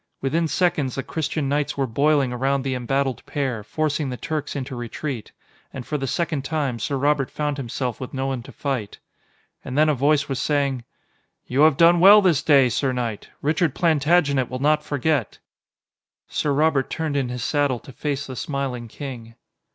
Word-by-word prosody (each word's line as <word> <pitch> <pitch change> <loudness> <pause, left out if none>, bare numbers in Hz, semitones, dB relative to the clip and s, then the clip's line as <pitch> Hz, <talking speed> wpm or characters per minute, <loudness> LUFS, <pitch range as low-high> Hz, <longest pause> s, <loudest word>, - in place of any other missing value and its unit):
Within 160 +5 0
seconds, 155 -7 0
the 135 - -3
Christian 155 -1 -2
knights 145 +1 -1
were 135 - +1
boiling 140 +1 +2
around 135 +2 0
the 135 -1 -1
embattled 130 +1 -1
pair, 130 -7 -2
forcing 150 +3 -1
the 125 - -4
Turks 150 0 -4
into 130 -1 -4
retreat. 120 +1 -5 0.4
And 125 - -7
for 150 - -4
the 135 - -2
second 155 -2 -1
time, 140 -5 -2
Sir 140 +5 -2
Robert 140 0 +1
found 150 -1 -2
himself 125 -2 -3
with 130 - -6
no 135 0 -3
one 135 -2 -2
to - - -12
fight. 130 -8 -3 0.7
And 130 - -5
then 155 +1 +5
a - - +4
voice 140 +1 +2
was 135 -1 -2
saying: 140 -5 0 0.6
"You 130 +3 0
have 155 -3 +5
done 170 +1 +6
well 200 +4 +9
this 180 -8 +3
day, 140 -4 +5
sir 130 +3 0
knight. 120 -4 -4
Richard 155 0 +1
Plantagenet 150 -4 +2
will 130 - -4
not 150 +3 +2
forget." 145 +1 -1 0.9
Sir 150 - -1
Robert 145 -1 +2
turned 160 -3 -2
in 135 -3 0
his 125 -1 -4
saddle 145 -2 +1
to - - -12
face 140 +2 -3
the 130 - -7
smiling 130 -3 -3
king. 115 -3 -8
140 Hz, 180 wpm, -23 LUFS, 130-150 Hz, 0.9 s, well